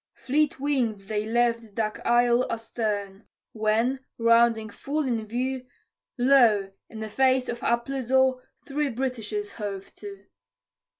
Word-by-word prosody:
Fleet 290 +1 0
wing'd 255 -7 0
they 210 +2 -3
left 230 -2 0
Duck 215 -2 -2
Isle 240 +1 +3
astern; 215 -3 -3 0.2
when, 225 +4 +1 0.2
rounding 230 -1 +3
full 295 +8 -3
in 230 -5 -2
view, 255 +3 -3 0.5
Lo! 240 -6 +4 0.2
in 220 - -8
the 220 - -3
face 260 +3 +2
of 240 0 -4
Appledore 260 +1 +1 0.2
three 290 +1 -1
Britishers 260 - -3
hove 200 - -6
to. 200 -1 -10
235 Hz, 120 wpm, -26 LUFS, 215-260 Hz, 0.5 s, Lo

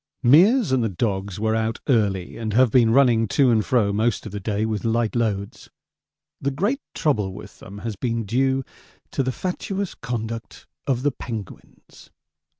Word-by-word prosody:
Meares 190 - +6
and 130 -2 +2
the 115 - 0
dogs 95 0 -2
were 110 +1 +1
out 110 0 -1
early, 100 -8 +1
and 110 -2 -4
have 125 0 +4
been 120 -2 +5
running 115 -3 +4
to 130 +4 +3
and 110 -2 +3
fro 105 -5 +1
most 110 +1 0
of 110 - -6
the 105 - -5
day 105 +2 -1
with 110 -3 -2
light 115 0 0
loads. 105 -4 -2 0.7
The 140 - 0
great 200 - -1
trouble 105 -11 0
with 100 0 -11
them 100 +1 -10
has 110 -2 -3
been 115 +1 -2
due 130 +5 +1 0.5
to - - 0
the 130 0 0
fatuous 190 +5 -3
conduct 115 -1 -6 0.2
of 130 -2 0
the 145 - +2
penguins. 115 -5 -9
115 Hz, 170 wpm, -23 LUFS, 105-130 Hz, 0.7 s, Meares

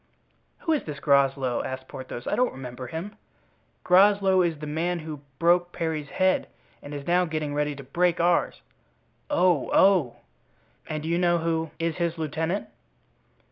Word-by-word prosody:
"Who 325 - -1
is 300 - 0
this 150 -3 -6
Groslow?" 135 -3 +2
asked 130 0 -6
Porthos. 130 -2 -8
"I - - 0
don't 250 0 +1
remember 125 -1 -7
him." 185 - -6 0.7
"Groslow 195 0 +5
is 170 -3 0
the 150 - -7
man 165 +4 -1
who 155 -3 -7 0.2
broke 175 +2 +3
Parry's 160 -3 -3
head 185 0 +1 0.3
and 145 - -10
is 145 -1 -6
now 180 +1 +3
getting 155 -3 -3
ready 150 0 -1
to 140 - -9
break 170 +6 +1
ours." 175 0 +1 0.7
"Oh! 180 - +2
oh!" 185 -11 +4 0.7
"And 155 -1 -3
do 160 - -4
you 170 +1 +1
know 175 -1 +3
who 165 -1 -1
is 165 0 -2
his 170 -1 -1
lieutenant?" 160 +5 -2
160 Hz, 160 wpm, -26 LUFS, 145-180 Hz, 0.7 s, Groslow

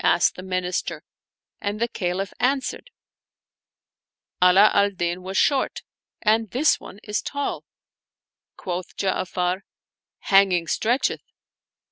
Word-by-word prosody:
" - - -14
asked - - +2
the - - -8
Minister, 185 -1 -3 0.6
and 205 0 -3
the 235 - +1
Caliph 190 -3 -3
answered, 270 - -1 1.5
"Ala 190 +3 +7
al 200 0 +4
Din 175 -2 -3
was 190 +1 -4
short 280 -2 +1 0.4
and 220 0 +2
this 275 +10 +2
one - - -11
is 210 0 -2
tall." 285 0 -4 0.9
Quoth 180 0 -5
Ja'afar, 185 -1 -1 0.4
" - - -70
Hanging 190 -3 +5
stretcheth." 235 - 0
195 Hz, 115 wpm, -24 LUFS, 180-225 Hz, 1.5 s, Ala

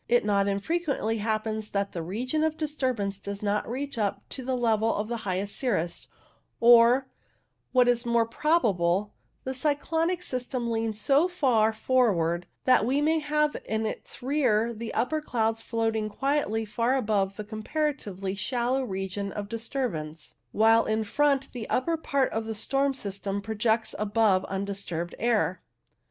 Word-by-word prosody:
It 240 -2 +3
not 200 -1 +2
unfrequently 225 - -1
happens 215 0 -2
that 200 0 -1
the 170 - -4
region 250 - -2
of 315 0 0
disturbance 255 -10 -2
does 200 +1 -6
not 210 +1 0
reach 270 +1 -4
up 205 -2 -2
to 265 - -7
the 255 0 -1
level 225 -2 +2
of 210 +1 -2
the 235 - -2
highest 195 +2 -2
cirrus, 190 -10 -2 0.5
or, 240 +3 +6 0.6
what 250 -1 +4
is 240 -1 +3
more 235 -1 +2
probable, 210 - +1 0.3
the 260 - -3
cyclonic 320 +6 0
system 250 -3 -3
leans 225 -1 -1
so 280 - +3
far 250 -11 +2
forward 200 -8 +1 0.2
that 255 - +5
we 260 +5 +1
may 315 +2 +2
have 300 0 +1
in 220 0 -1
its 220 - -6
rear 240 -5 +2
the 225 +1 -6
upper 310 +5 0
clouds 225 -5 0
floating 225 -2 -1
quietly 225 -2 0
far 230 +4 0
above 205 -6 0
the 210 - -5
comparatively 215 -3 -3
shallow 245 +5 -1
region 195 -2 -4
of 205 0 -5
dis 230 0 -4
turbance, 160 - -3 0.2
while 225 +1 +5
in 220 0 0
front 275 +4 +1
the 240 -3 -6
upper 330 +6 +1
part 280 -4 0
of 225 0 -2
the 220 0 -4
storm 275 +5 +1
system 200 -3 -4
projects 220 +2 0
above 205 -2 +2
undisturbed 195 -3 -4
air. 215 -5 +1
225 Hz, 155 wpm, -27 LUFS, 205-265 Hz, 0.6 s, or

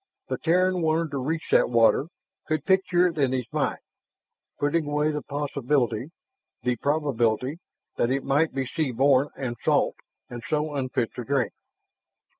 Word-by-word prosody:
The - - -2
Terran 180 +2 +2
wanted 160 0 +1
to 140 - -2
reach 160 +5 -3
that - - +4
water, 120 +4 +4 0.4
could 155 -2 -1
picture 185 -2 +3
it 165 -3 -1
in 135 -2 +2
his 125 -2 -1
mind, - - 0 0.8
putting 145 +2 0
away 150 +1 +1
the 150 -1 -3
possibility 140 -4 -1 0.5
the 125 -1 0
probability 135 -1 0 0.4
that 120 - +2
it 135 +1 0
might 150 +4 +2
be 135 0 -2
sea 150 +2 -1
born 135 +3 +3
and 130 -3 -3
salt, - - +2 0.3
and 120 -1 -8
so 150 0 0
unfit 130 -4 -1
to 125 - -5
drink. 135 0 0
140 Hz, 155 wpm, -26 LUFS, 130-155 Hz, 0.8 s, that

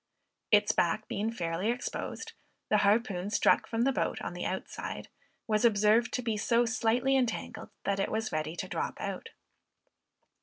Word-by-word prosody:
Its 210 -1 +5
back 195 +6 +1
being 215 +3 -2
fairly 175 -1 -2
exposed, 245 +1 -4 0.4
the 210 - +4
harpoon 200 -2 +2
struck 210 - +3
from 230 0 0
the 270 - +3
boat - - -1
on - - -5
the - - -5
outside, - - -5 0.4
was 215 0 +1
observed 220 +1 +4
to 250 - -2
be 225 -2 0
so 235 +3 +2
slightly 245 +3 +1
entangled, 240 -3 -2
that 200 -1 0
it 195 - 0
was 220 0 -2
ready 155 +1 -2
to - - -4
drop - - -3
out. - - -5
220 Hz, 160 wpm, -30 LUFS, 200-235 Hz, 0.4 s, Its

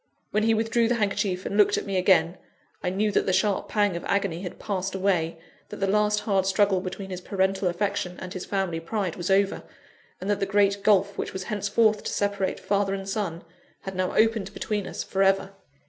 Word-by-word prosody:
When 215 - +2
he 225 +1 +3
withdrew 225 +1 +2
the 245 - +1
handkerchief 195 -3 -1
and - - -3
looked 210 -1 +4
at - - -3
me 195 -1 -3
again, 180 -2 +3 0.4
I - - -1
knew 205 +3 0
that - - +1
the - - +3
sharp 190 +2 +1
pang 205 -4 +1
of 170 - -5
agony 195 -4 0
had 180 -3 -6
passed 195 -2 -3
away, 180 -4 0 0.3
that - - -7
the 195 - -1
last 210 +1 +2
hard 195 -3 +1
struggle 195 -1 +3
between 190 +1 -6
his 185 0 -5
parental 190 0 0
affection 180 0 -1
and 185 0 -7
his 185 - -5
family 190 -4 -1
pride 185 +1 -3
was 175 0 -4
over, 195 +1 +2 0.6
and 185 - -6
that 205 -1 +1
the 195 - 0
great 200 0 +2
gulph 200 -1 +3
which - - -3
was 190 - -4
hence 205 0 -3
forth 215 0 +3
to - - -2
separate 200 -2 -1
father 200 -1 0
and 195 0 -6
son, 190 -5 -3 0.4
had 195 -1 -6
now 185 0 -1
opened 220 -3 +2
between 210 -2 -2
us - - -4
for 195 - -2
ever. 195 0 +3
195 Hz, 215 wpm, -26 LUFS, 185-205 Hz, 0.6 s, looked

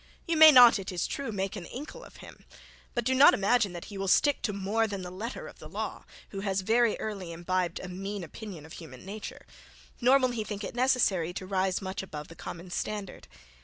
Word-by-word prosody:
You 335 - 0
may 315 0 +10
not, 245 -5 +8
it 190 - -5
is 180 -2 -1
true, 275 -4 -4
make 195 -1 -3
an 185 -4 -7
Inkle 305 - -8
of - - -15
him; - - -14 0.5
but 240 -2 -1
do 260 - +2
not 265 +2 +7
imagine 205 0 +2
that 175 - -7
he 200 -1 -8
will 195 - -2
stick 290 +9 +3
to 215 - -1
more 205 +3 0
than 200 -3 -5
the 180 - -7
letter 220 +7 -6
of - - -13
the - - -11
law, - - -5 0.2
who 195 - -6
has 195 -1 -1
very 225 +3 +2
early 195 -5 -5
imbibed 175 +1 -2
a 185 - -7
mean 195 +2 -5
opinion 170 -1 -9
of 160 - -12
human 150 -5 -11
nature; 205 +2 -8 0.6
nor 255 +3 +6
will 255 -2 +1
he 230 -3 -3
think 210 -1 -6
it - - -5
necessary 235 -9 +2
to 185 - -6
rise 190 0 0
much 190 0 -4
above 150 -6 -8
the 165 - -12
common 175 +2 -8
standard. 205 0 -5
200 Hz, 225 wpm, -29 LUFS, 185-235 Hz, 0.6 s, may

